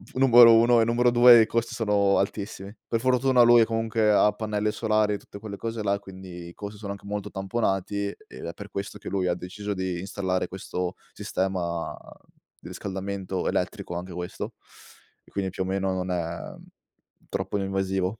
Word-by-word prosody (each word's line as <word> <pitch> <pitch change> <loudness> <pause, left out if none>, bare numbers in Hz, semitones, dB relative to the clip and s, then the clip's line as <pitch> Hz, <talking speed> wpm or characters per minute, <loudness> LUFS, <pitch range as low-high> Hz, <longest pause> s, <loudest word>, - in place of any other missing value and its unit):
Numero 120 -3 +8
1 115 +1 +5
e - - +3
numero 120 +1 +3
2, 120 -1 +8
i 110 - +4
costi 115 +1 -1
sono 105 -3 +2
altissimi. 100 0 -3
Per 115 - 0
fortuna, 130 0 +4
lui, 120 -1 +7
comunque, 115 -1 +1
ha 105 0 +5
pannelli 105 0 -2
solari 110 -2 +1
e 100 - -1
tutte 100 - -12
quelle 105 -2 -7
cose 115 -1 -4
là. 100 -1 +1
E, - - -6
quindi, 95 -3 -10
i 85 - -11
costi 105 0 -8
sono 100 -2 -5
anche 100 - -13
molto 105 0 -4
tamponati. 100 0 -2
Ed 65 - -10
è 85 - -5
per 100 +1 -10
questo 100 0 -5
che - - -12
lui 95 -2 0
ha 90 - +1
deciso 100 +4 -5
di 95 -2 -3
installare 95 -1 -2
questo 90 -1 -4 0.2
sistema 90 -3 -2 0.6
di - - -12
riscaldamento 95 -1 -4
elettrico, 85 - -2
anche 90 +1 -5
questo, 90 0 -5 0.7
e, - - -22
quindi, 95 -2 -2
più 95 - -3
o - - -5
meno, 95 0 -1
non 90 0 -3
è 85 -1 -4 0.7
troppo 105 - -2
invasivo. 95 0 -1
100 Hz, 180 wpm, -26 LUFS, 95-110 Hz, 0.7 s, Numero